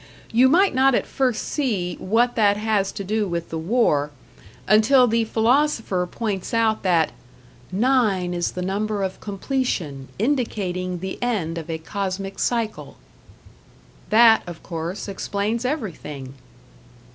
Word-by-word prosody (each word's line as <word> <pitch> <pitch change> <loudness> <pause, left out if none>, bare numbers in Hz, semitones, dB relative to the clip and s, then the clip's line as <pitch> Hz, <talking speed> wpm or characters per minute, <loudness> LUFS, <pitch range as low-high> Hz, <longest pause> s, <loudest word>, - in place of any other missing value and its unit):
You 250 +3 +5
might 375 +7 +4
not 265 0 +4
at - - 0
first 255 -4 -1
see 210 - -1
what 235 +5 +2
that 205 -2 +3
has 210 -2 0
to 200 - -6
do 210 +2 -1
with 170 -1 -4
the 165 - -3
War 160 - +1 0.6
until 220 +5 +5
the 230 -1 +1
Philosopher 225 -5 +1
points 205 +1 -3
out 225 -1 +2
that 170 -4 +2 0.6
"9 205 -5 +2
is 175 -1 -1
the 180 - -4
number 205 +2 -1
of 190 -1 -4
completion, 195 - -3
indicating 190 -8 -1
the 190 0 -5
end 185 -9 -1
of 160 - -9
a 160 - -2
cosmic 195 +3 -4
cycle." 230 -3 -2 1.1
That, 225 0 +6
of 175 -2 -9
course, 170 +4 -5
explains 205 +4 -2
everything. 155 - -4
205 Hz, 135 wpm, -23 LUFS, 180-235 Hz, 1.1 s, That